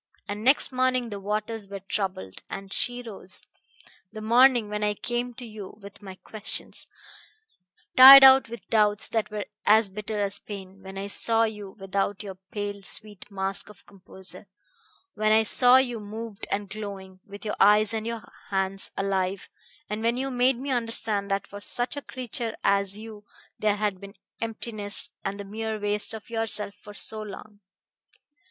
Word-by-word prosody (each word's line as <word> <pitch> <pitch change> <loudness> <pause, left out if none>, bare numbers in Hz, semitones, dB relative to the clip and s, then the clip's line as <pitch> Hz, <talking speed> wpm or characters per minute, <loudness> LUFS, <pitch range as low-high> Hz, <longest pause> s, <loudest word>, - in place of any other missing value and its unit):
And 205 +1 -5
next 270 +4 +4
morning 255 -1 +1
the 200 - -5
waters 210 +1 -3
were 200 0 -7
troubled, 190 - -3
and 195 0 -7
she 245 0 -1
rose 195 -4 -7 0.7
the 215 - -8
morning 240 +1 +5
when 210 0 -3
I 210 0 +1
came 240 +2 -3
to 250 - -8
you 215 -3 -9
with 200 0 -12
my 190 -2 -9
questions, 215 +2 -1 1.1
tired 270 +1 +12
out 265 -2 +8
with 235 0 -9
doubts 210 -2 +2
that 225 -2 -1
were 210 -1 -4 0.2
as 215 -1 +5
bitter 210 +2 -5
as 200 -1 +1
pain, 195 -3 -8
and 190 0 -20
when 190 0 -9
I 195 - -4
saw 225 +3 +2
you 210 -3 -4
without 195 +1 -2
your 195 -2 -6 0.2
pale, 205 -1 -4
sweet 205 0 +1
mask 195 -1 -3
of 210 - -16
composure 190 0 -8 0.7
when 215 0 +1
I 220 +1 +5
saw 245 +3 +6
you 245 -3 +1
moved 215 0 -8
and 200 0 -2
glowing, 195 -2 -8
with 200 +2 -11
your 210 - -2
eyes 210 +1 +5
and 220 0 -3
your 230 -2 -4 0.3
hands 195 0 -1
alive, 195 -1 -1 0.4
and 210 +1 -4
when 230 +2 +1
you 270 +1 -2
made 250 0 +3
me 270 +2 -4
understand 225 -4 0
that 195 0 -1
for 205 0 -10
such 245 +6 -1
a 285 - -4
creature 240 -3 -5
as 200 0 +2
you 215 -1 -10 0.4
there 210 -1 +2
had 205 -2 -2
been 200 +1 -11 0.3
emptiness 215 -2 -4
and 200 +1 -4
the 200 - -6
mere 220 +1 -4
waste 210 +1 0
of 220 +1 -11
yourself 225 -3 -2
for 205 0 -14
so 220 +1 -3
long. 210 0 -10
210 Hz, 175 wpm, -26 LUFS, 200-225 Hz, 1.1 s, tired